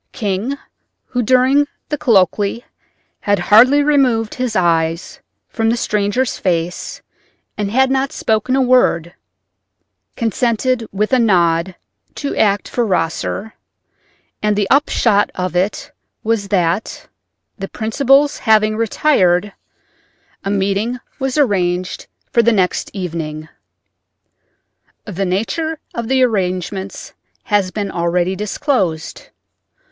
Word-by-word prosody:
King, 210 Hz, +6 st, -2 dB, 0.5 s
who 245 Hz, -, -2 dB
during 260 Hz, +4 st, +3 dB, 0.2 s
the 295 Hz, -, -1 dB
colloquy 205 Hz, +1 st, +2 dB, 0.5 s
had 205 Hz, 0 st, +1 dB
hardly 240 Hz, +10 st, +5 dB
removed 255 Hz, -7 st, +2 dB
his 250 Hz, -3 st, -3 dB
eyes 165 Hz, -2 st, 0 dB, 0.3 s
from 225 Hz, -1 st, -1 dB
the 235 Hz, -, +1 dB
stranger's 210 Hz, +4 st, -1 dB
face 175 Hz, -1 st, -2 dB, 0.5 s
and 205 Hz, -1 st, -2 dB
had 265 Hz, +4 st, +2 dB
not 270 Hz, +1 st, 0 dB
spoken 220 Hz, +3 st, 0 dB
a 270 Hz, -, +3 dB
word, 190 Hz, -10 st, +2 dB, 1.0 s
consented 235 Hz, +1 st, 0 dB
with 210 Hz, +5 st, -1 dB
a 255 Hz, -, +5 dB
nod 175 Hz, -4 st, +2 dB, 0.4 s
to 285 Hz, -, -4 dB
act 205 Hz, -1 st, +1 dB
for 245 Hz, -, -1 dB
Rosser, 190 Hz, +2 st, -2 dB, 0.9 s
and 210 Hz, 0 st, +1 dB
the 205 Hz, -1 st, 0 dB
upshot 230 Hz, -7 st, +3 dB
of 180 Hz, -1 st, -3 dB
it 200 Hz, +10 st, -1 dB, 0.3 s
was 220 Hz, -2 st, 0 dB
that, 185 Hz, 0 st, -1 dB, 0.5 s
the 195 Hz, -, -4 dB
principals 275 Hz, +5 st, +2 dB
having 215 Hz, -2 st, +3 dB
retired, 205 Hz, -5 st, +2 dB, 0.9 s
a 195 Hz, -, -3 dB
meeting 200 Hz, +4 st, 0 dB, 0.2 s
was 265 Hz, +1 st, -2 dB
arranged 185 Hz, -9 st, 0 dB, 0.2 s
for 235 Hz, -, +4 dB
the 235 Hz, +1 st, +3 dB
next 190 Hz, -5 st, 0 dB
evening. 160 Hz, -4 st, -5 dB, 1.6 s
The 195 Hz, -2 st, -3 dB
nature 270 Hz, -, -2 dB, 0.2 s
of 235 Hz, -1 st, -4 dB
the 260 Hz, +1 st, +3 dB
arrangements 190 Hz, -3 st, -2 dB, 0.3 s
has 205 Hz, -3 st, +1 dB
been 200 Hz, +1 st, -4 dB
already 175 Hz, +2 st, 0 dB
disclosed. 200 Hz, -, -2 dB
210 Hz, 110 wpm, -17 LUFS, 185-250 Hz, 1.6 s, hardly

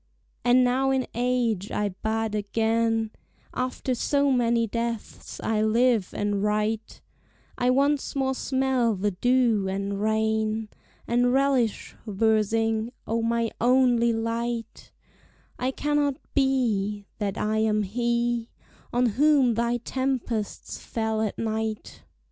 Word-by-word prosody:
And 245 Hz, +1 st, +5 dB
now 260 Hz, +2 st, +2 dB
in 265 Hz, -1 st, +1 dB
age 240 Hz, -5 st, 0 dB
I 210 Hz, -1 st, -1 dB
bud 220 Hz, +3 st, -2 dB
again; 225 Hz, +1 st, 0 dB, 0.4 s
After 255 Hz, +1 st, -2 dB
so 280 Hz, +3 st, +1 dB
many 235 Hz, -2 st, +2 dB
deaths 230 Hz, 0 st, -5 dB
I 220 Hz, -1 st, 0 dB
live 225 Hz, -1 st, +2 dB
and 205 Hz, -1 st, -1 dB
write; 215 Hz, +1 st, -1 dB, 0.5 s
I 245 Hz, -, +1 dB
once 280 Hz, +3 st, +1 dB
more 265 Hz, -1 st, +1 dB
smell 260 Hz, -4 st, +1 dB
the 205 Hz, +2 st, 0 dB
dew 235 Hz, 0 st, +2 dB
and 200 Hz, +1 st, -3 dB
rain, 220 Hz, 0 st, 0 dB, 0.4 s
And 245 Hz, +1 st, +2 dB
relish 265 Hz, -4 st, +1 dB
versing: 220 Hz, +2 st, +1 dB
O 230 Hz, +1 st, -1 dB
my 230 Hz, 0 st, 0 dB
only 245 Hz, -1 st, +4 dB
light, 230 Hz, 0 st, -3 dB, 0.7 s
It 260 Hz, +1 st, -1 dB
cannot 295 Hz, -1 st, +1 dB, 0.2 s
be 220 Hz, -7 st, +1 dB
That 200 Hz, -2 st, -2 dB
I 215 Hz, +1 st, 0 dB
am 215 Hz, -1 st, +2 dB
he 235 Hz, +2 st, -1 dB, 0.4 s
On 245 Hz, +1 st, +2 dB
whom 265 Hz, +2 st, +3 dB
thy 235 Hz, +2 st, 0 dB
tempests 245 Hz, -3 st, -3 dB
fell 220 Hz, -1 st, -2 dB
all 220 Hz, -, +1 dB
night! 220 Hz, -1 st, -3 dB
230 Hz, 120 wpm, -26 LUFS, 220-250 Hz, 0.7 s, And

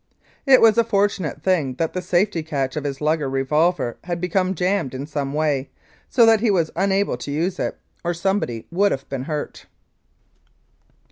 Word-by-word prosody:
It 265 Hz, -1 st, +7 dB
was 225 Hz, 0 st, +6 dB
a -, -, +5 dB
fortunate 200 Hz, -8 st, -1 dB
thing 160 Hz, -9 st, +1 dB
that 165 Hz, +3 st, -2 dB
the 185 Hz, -, -2 dB
safety 180 Hz, 0 st, +1 dB
catch 140 Hz, -4 st, -3 dB
of 150 Hz, -1 st, -3 dB
his 140 Hz, 0 st, -4 dB
Luger 150 Hz, -2 st, +1 dB
revolver 135 Hz, +1 st, +1 dB
had 175 Hz, -1 st, -3 dB
become 185 Hz, +1 st, 0 dB
jammed 180 Hz, -6 st, -1 dB
in 135 Hz, +2 st, -4 dB
some 145 Hz, -2 st, -3 dB
way, 145 Hz, -3 st, 0 dB, 0.4 s
so 240 Hz, -3 st, +5 dB
that 225 Hz, -1 st, +5 dB
he 225 Hz, +1 st, +1 dB
was 170 Hz, -5 st, +1 dB
unable 195 Hz, -4 st, +1 dB
to 125 Hz, -, -7 dB
use 170 Hz, +6 st, -1 dB
it, -, -, -2 dB, 0.3 s
or 175 Hz, 0 st, -1 dB
somebody 170 Hz, -, -1 dB
would 200 Hz, +4 st, +2 dB
have 135 Hz, -, -3 dB
been 135 Hz, -1 st, -4 dB
hurt. 150 Hz, -1 st, -5 dB
165 Hz, 180 wpm, -22 LUFS, 145-195 Hz, 0.4 s, It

